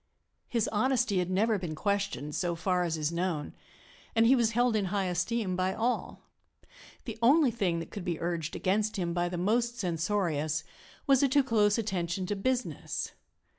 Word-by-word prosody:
His 230 Hz, -3 st, 0 dB
honesty 240 Hz, -2 st, +1 dB
had 180 Hz, 0 st, -1 dB
never 210 Hz, +3 st, +2 dB
been 170 Hz, -4 st, -4 dB
questioned, 200 Hz, -6 st, -1 dB
so 175 Hz, 0 st, -1 dB
far 180 Hz, +2 st, 0 dB
as 165 Hz, -2 st, -1 dB
is 155 Hz, 0 st, -1 dB
known, 170 Hz, -3 st, -2 dB, 0.6 s
and 225 Hz, 0 st, +5 dB
he 255 Hz, +4 st, +6 dB
was 230 Hz, -3 st, +2 dB
held 240 Hz, 0 st, +2 dB
in 205 Hz, -2 st, +1 dB
high 195 Hz, +1 st, -1 dB
esteem 185 Hz, +3 st, -1 dB
by 185 Hz, +1 st, 0 dB
all. 240 Hz, +2 st, -2 dB, 0.8 s
The 225 Hz, -2 st, -6 dB
only 275 Hz, +2 st, +5 dB
thing 190 Hz, -7 st, 0 dB
that 165 Hz, -, -6 dB
could 200 Hz, -, -6 dB
be 175 Hz, -3 st, -2 dB
urged 170 Hz, -2 st, -2 dB
against 210 Hz, +3 st, 0 dB
him 170 Hz, -2 st, -1 dB
by 175 Hz, 0 st, 0 dB
the 175 Hz, -, -4 dB
most 235 Hz, +6 st, +1 dB
censorious 165 Hz, -4 st, -1 dB, 0.4 s
was 270 Hz, -2 st, +4 dB
a 280 Hz, -, +4 dB
too 280 Hz, +2 st, +4 dB
close 210 Hz, -4 st, +3 dB
attention 185 Hz, -4 st, -2 dB
to 205 Hz, -, -2 dB
business. 250 Hz, +5 st, -2 dB
195 Hz, 175 wpm, -30 LUFS, 175-230 Hz, 0.8 s, he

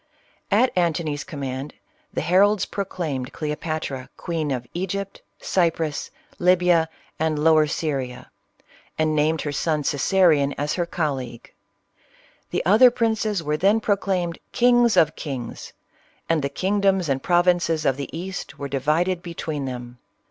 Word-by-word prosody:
At 225 Hz, +5 st, +3 dB
Antony's 160 Hz, -4 st, 0 dB
command, 140 Hz, -4 st, -5 dB, 0.4 s
the -, -, -2 dB
heralds 200 Hz, +3 st, +3 dB
proclaimed 160 Hz, -10 st, -4 dB
Cleo 150 Hz, -1 st, -3 dB
patra, 150 Hz, -5 st, -4 dB
queen 165 Hz, -4 st, -2 dB
of 125 Hz, -3 st, -2 dB
Egypt, 195 Hz, +2 st, -4 dB, 0.2 s
Cyprus, 165 Hz, -4 st, 0 dB, 0.3 s
Libya, 175 Hz, -2 st, +4 dB, 0.3 s
and 160 Hz, -1 st, 0 dB
Lower 155 Hz, 0 st, +4 dB
Syria, 135 Hz, -5 st, -3 dB, 0.7 s
and 155 Hz, 0 st, +1 dB
named 155 Hz, +1 st, +2 dB
her 145 Hz, -, -2 dB
son 150 Hz, +1 st, 0 dB
Caesarion 145 Hz, -1 st, +3 dB
as 145 Hz, +1 st, -1 dB
her 175 Hz, -2 st, -1 dB
colleague. 135 Hz, -9 st, -4 dB, 1.0 s
The -, -, -2 dB
other 220 Hz, +8 st, +7 dB
princes 220 Hz, -5 st, 0 dB
were 150 Hz, 0 st, 0 dB
then 200 Hz, +6 st, +3 dB
proclaimed 190 Hz, -5 st, -1 dB
" -, -, -47 dB
kings 240 Hz, -2 st, +5 dB
of 155 Hz, -1 st, +4 dB
kings 130 Hz, -6 st, -6 dB, 0.3 s
;" -, -, -36 dB
and 165 Hz, -2 st, +2 dB
the 140 Hz, -, -1 dB
kingdoms 195 Hz, +2 st, +1 dB
and 135 Hz, -2 st, 0 dB
provinces 175 Hz, -2 st, +2 dB
of 135 Hz, -, +3 dB
the 140 Hz, 0 st, -5 dB
East 180 Hz, +3 st, -6 dB
were 140 Hz, -, -4 dB
divided 155 Hz, +7 st, 0 dB
between 160 Hz, -4 st, -4 dB
them. 125 Hz, -1 st, -7 dB
160 Hz, 140 wpm, -23 LUFS, 145-185 Hz, 1.0 s, other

